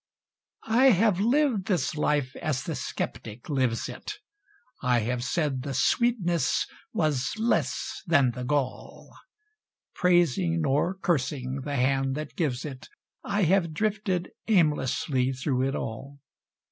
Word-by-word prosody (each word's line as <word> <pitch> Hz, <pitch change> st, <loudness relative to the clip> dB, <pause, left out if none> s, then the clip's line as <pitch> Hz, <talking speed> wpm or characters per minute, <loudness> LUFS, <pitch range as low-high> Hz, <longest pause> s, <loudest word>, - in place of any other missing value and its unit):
I 235 Hz, +4 st, +4 dB
have 215 Hz, -5 st, +4 dB
lived 240 Hz, -2 st, +2 dB
this 180 Hz, -9 st, 0 dB
life 145 Hz, -3 st, 0 dB
as 150 Hz, -6 st, -2 dB
the -, -, -3 dB
skeptic 110 Hz, +3 st, -5 dB
lives 130 Hz, -5 st, 0 dB
it; -, -, -6 dB, 0.7 s
I 125 Hz, -2 st, +2 dB
have 120 Hz, +2 st, -2 dB
said 145 Hz, -3 st, -1 dB
the 135 Hz, 0 st, -4 dB
sweetness 180 Hz, -, +2 dB, 0.3 s
was 150 Hz, -5 st, 0 dB
less 225 Hz, +2 st, -1 dB
than 140 Hz, -7 st, +4 dB
the 125 Hz, +1 st, -6 dB
gall; 135 Hz, 0 st, -3 dB, 0.8 s
Praising, 175 Hz, -1 st, +2 dB
nor 150 Hz, +6 st, +1 dB
cursing, 135 Hz, -7 st, -1 dB
the 145 Hz, -1 st, -2 dB
Hand 135 Hz, +1 st, +1 dB
that 150 Hz, 0 st, -6 dB
gives 140 Hz, -7 st, -1 dB
it, 135 Hz, -3 st, -8 dB, 0.3 s
I 205 Hz, 0 st, 0 dB
have 170 Hz, -2 st, +2 dB
drifted 205 Hz, -2 st, -1 dB, 0.2 s
aimlessly 145 Hz, -, +2 dB
through 130 Hz, 0 st, 0 dB
it 135 Hz, -, -2 dB
all. 135 Hz, +6 st, -6 dB
150 Hz, 125 wpm, -27 LUFS, 130-180 Hz, 0.8 s, I